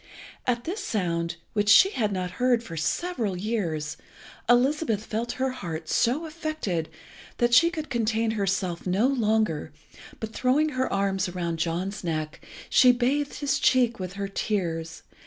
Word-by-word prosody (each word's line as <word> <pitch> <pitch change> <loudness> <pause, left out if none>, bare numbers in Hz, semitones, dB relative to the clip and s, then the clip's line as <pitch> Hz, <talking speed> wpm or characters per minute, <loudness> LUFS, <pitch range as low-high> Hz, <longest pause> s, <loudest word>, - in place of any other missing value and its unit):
At 240 -1 +1
this 390 - -4
sound, 170 - -1 0.2
which 205 -1 +1
she 370 - +8
had 215 - 0
not 185 -2 -2
heard 245 -2 +3
for 170 -7 -8
several 210 - -1
years, 175 -8 -2 0.5
Elizabeth 245 -3 +2
felt 230 +2 -3
her 260 0 -1
heart 165 -9 -6
so 270 +8 +1
affected 310 - -3 0.5
that 240 0 +2
she 335 +7 +7
could 315 -4 -6
contain 225 -1 +1
herself 195 -4 -1
no 190 +6 +2
longer, 220 - +1 0.5
but 220 0 -5
throwing 275 +7 +2
her 260 -2 -1
arms 195 -1 0
about 175 -2 -3
John's 175 +5 -2
neck, 155 -2 -3 0.2
she 255 - +6
bathed 265 +4 0
his 285 -2 +1
cheek 245 -4 +3
with 185 -1 -5
her 200 0 -3
tears. 170 -6 -3
215 Hz, 150 wpm, -26 LUFS, 180-255 Hz, 0.5 s, she